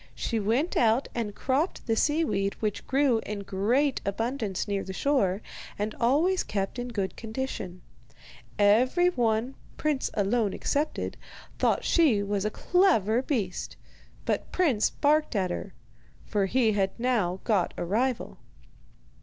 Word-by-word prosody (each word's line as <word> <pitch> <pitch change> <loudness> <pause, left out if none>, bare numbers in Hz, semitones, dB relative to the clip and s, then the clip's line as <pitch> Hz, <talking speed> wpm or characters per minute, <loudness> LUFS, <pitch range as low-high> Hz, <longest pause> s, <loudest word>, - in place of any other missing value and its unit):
She 230 - -1
went 235 - 0
out 230 +3 +3
and 220 -4 -3
cropped 275 +7 -1
the 225 - +1
seaweed 220 -9 +1
which 210 -2 -3
grew 265 -4 +3
in 210 -1 -5
great 235 +9 +1
abundance 225 -1 -2
near 200 -1 -1
the 190 - -6
shore, 205 -6 +1 0.3
and 210 +1 -2
always 310 +10 +3
kept 195 +4 -3
in 245 - -3
good 200 -6 -3
condition. 220 -6 -5 0.7
Every 250 - +4
one 235 -2 0 0.2
Prince 300 -3 0
alone 210 0 +1
excepted, 295 +2 -2 0.4
thought - - +2
she 270 -12 +3
was 200 0 -1
a - - +2
clever 245 - +2
beast; 220 -10 -3 0.5
but - - -2
Prince 285 - +2
barked 300 -2 +1
at 185 -3 +1
her, 185 +2 -5 0.5
for 200 -3 0
he 230 +1 +2
had 195 +1 -1
now 215 -8 +1
got 200 -6 +1
a - - -2
rival. 235 +7 -1
225 Hz, 135 wpm, -27 LUFS, 200-265 Hz, 0.7 s, Every